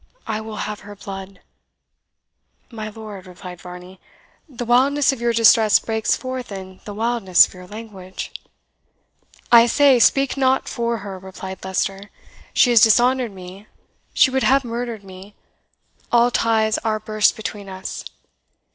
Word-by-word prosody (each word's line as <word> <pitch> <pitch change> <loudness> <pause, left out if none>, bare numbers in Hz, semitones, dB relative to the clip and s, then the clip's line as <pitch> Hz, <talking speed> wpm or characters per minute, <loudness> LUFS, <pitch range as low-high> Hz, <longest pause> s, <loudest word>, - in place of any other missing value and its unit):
I 220 -1 -3
will 220 0 -8
have 210 -1 -6
her 205 0 -11
blood!" 195 -1 -9 1.3
"My 215 -2 -6
lord," 210 -3 -10
replied 180 -1 -11
Varney, 180 +1 -11 0.5
"the 245 -3 -6
wildness 270 +4 +3
of 250 - -8
your 235 0 +1
distress 225 -1 +5
breaks 220 -1 -1
forth 255 -3 -6
in 190 -1 -9
the 205 - -7
wildness 225 -4 +4
of - - -14
your 180 -1 -12
language." 200 -3 -9 1.2
"I 235 0 +8
say, 275 0 +4
speak 275 +3 +3
not 265 -1 +1
for 235 -1 -2
her!" 195 -2 -7
replied 190 0 -9
Leicester; 195 +1 -3 0.4
"she 245 - +4
has 235 -2 +6
dishonoured 240 +1 +3
me 190 +2 -12 0.4
she 260 - +4
would 265 0 0
have 270 +1 +3
murdered 235 -2 -5
me 190 +1 -13 0.8
all 240 0 +4
ties 220 -2 +1
are 215 -1 -1
burst 215 -1 +1
between 210 -2 -7
us. 190 0 -7
215 Hz, 145 wpm, -21 LUFS, 195-240 Hz, 1.3 s, I